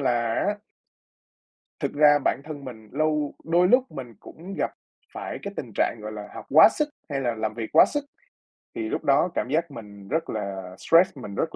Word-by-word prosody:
là 120 -4 +1
á 205 - 0 1.2
thực - - -2
ra 145 0 +6
bản - - +1
thân 145 -2 -8
mình 110 -4 -10
lâu 150 0 0
đôi 175 +2 +3
lúc 250 +5 +3
mình 125 -3 -8
cũng 180 +5 -10
gặp - - 0 0.4
phải - - -5
cái 200 - -5
tình 120 - -5
trạng, - - +1
gọi 110 - -6
là, 105 -1 -7
học - - -8
quá 155 +9 +8
sức 300 +4 -1 0.2
hay 140 -2 -2
là 120 -3 -1
làm 110 -1 -2
việc 115 -1 -5
quá 160 - +8
sức, 290 -1 -3 0.7
thì 345 - -3
lúc - - -2
đó 145 +5 +3
cảm - - -1
giác 160 +2 0
mình 105 -5 -11
rất 160 +9 -1
là 95 -3 -5
stress, 165 - +4
mình 105 -6 -7
rất 160 - -2
140 Hz, 205 wpm, -25 LUFS, 110-165 Hz, 1.2 s, quá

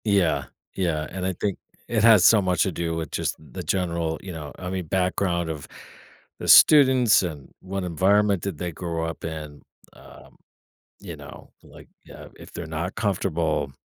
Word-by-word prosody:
Yeah, 90 - +2 0.3
yeah, 80 -5 -1
and 95 -1 -4
I 95 - -1
think 100 +2 -3 0.3
it 110 -3 0
has 110 -5 +7
so 110 -2 +6
much 90 -2 +1
to 95 - -1
do 85 0 -3
with, 80 -1 -5
just, - - -2
the 90 +4 -9
general, 85 -2 -1
you 95 - -8
know, 75 -3 -7
I 90 - -6
mean, 95 -1 -3
background 90 -1 0
of 75 -3 -6 0.7
the - - -6
students, 130 -6 +7
and 75 -6 -6
what 95 0 -4
environment 95 +3 +2
did 100 -6 -4
they 90 +1 -4
grow 85 0 -4
up 80 - -6
in. 75 -2 -7 0.3
Um, - - -16 0.6
you - - -8
know, - - -13
like, - - -15 0.3
uh, - - -11
if - - -13
they're 85 - -6
not 80 +4 -4
comfortable, 85 -9 -1
90 Hz, 175 wpm, -24 LUFS, 80-95 Hz, 0.7 s, has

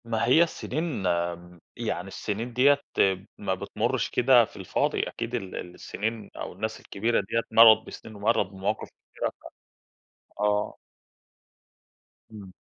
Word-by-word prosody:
ما 115 0 0
هي 145 +8 +6
السنين 155 - -3
آمم، 85 0 -2 0.2
يعني - - -3
السنين 115 +4 -4
ديّة 140 +3 +4 0.6
ما 100 -2 -1
بتمرش 100 +2 -1
كده 125 -1 +5
في - - -16
الفاضي، 95 -2 0
أكيد 115 +1 -4
ال 100 -6 -5
السنين 105 +4 -5
أو - - -6
الناس - - -4
الكبيرة 115 +3 0
ديّة 115 +4 -1
مرّت 110 -1 +7
بسنين 110 - -10
ومرّت 105 +1 +2
بمواقِف 100 +3 -3
كتيرة - - -5
ف - - -27 1.0
آه. 105 0 +1 1.6
إمم. 100 -4 -10
110 Hz, 130 wpm, -27 LUFS, 95-120 Hz, 1.6 s, مرّت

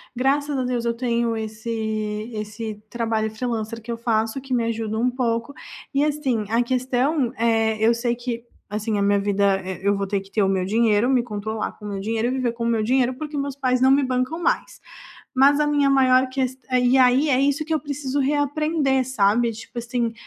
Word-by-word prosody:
graças 280 +3 +1
a 260 - 0
Deus, 245 -1 -2
eu 235 - +1
tenho 235 -1 0
esse 220 0 -3
esse 215 0 -6
trabalho 225 -2 -1
freelancer 225 0 -4
que 235 +2 -7
eu 230 - -3
faço 225 +1 0
que 265 -1 -6
me 235 -2 +2
ajuda 220 -1 -2
um 245 +2 +2
pouco 235 +1 -1 0.4
e, 280 +1 +2
assim, 275 -8 0
a 235 +2 +2
questão 255 +2 0
é 225 -1 +2
eu 235 - +5
sei 235 0 -1
que, 240 -1 -5 0.2
assim, 210 0 -2
a - - 0
minha 200 0 +3
vida, 200 -1 +1
eh, 190 0 -5
eu 200 0 +3
vou 200 -1 -2
ter 200 -1 -1
que 195 0 -17
ter 210 - +1
o - - +2
meu 190 -1 0
dinheiro, 220 +2 +2
me 255 -2 +3
controlar 220 -1 -4
com 210 - -13
o - - -4
meu 195 -1 -4
dinheiro 225 +3 -1
e - - -1
viver 255 -3 -1
com 235 0 -5
o - - 0
meu 225 -2 +1
dinheiro, 255 +2 +2
porque 300 +1 -6
meus 280 -1 -3
pais 255 -2 +1
não 265 +1 +5
me 280 +1 +5
bancam 255 +6 -1
mais. - - -1 0.6
Mas 280 +3 +5
a 300 - +3
minha 290 -1 +3
maior 260 -1 +4
ques 260 0 -2
eh, 255 -1 +2
e 250 +2 +4
aí 260 +4 +4
é 260 0 +3
isso 285 +2 +1
que 320 - -4
eu 310 - +3
preciso 285 -1 -3
reaprender, 290 -1 +1
sabe, 230 0 +2
tipo 225 +2 -9
assim, 235 -1 -2
235 Hz, 220 wpm, -23 LUFS, 220-265 Hz, 0.6 s, eu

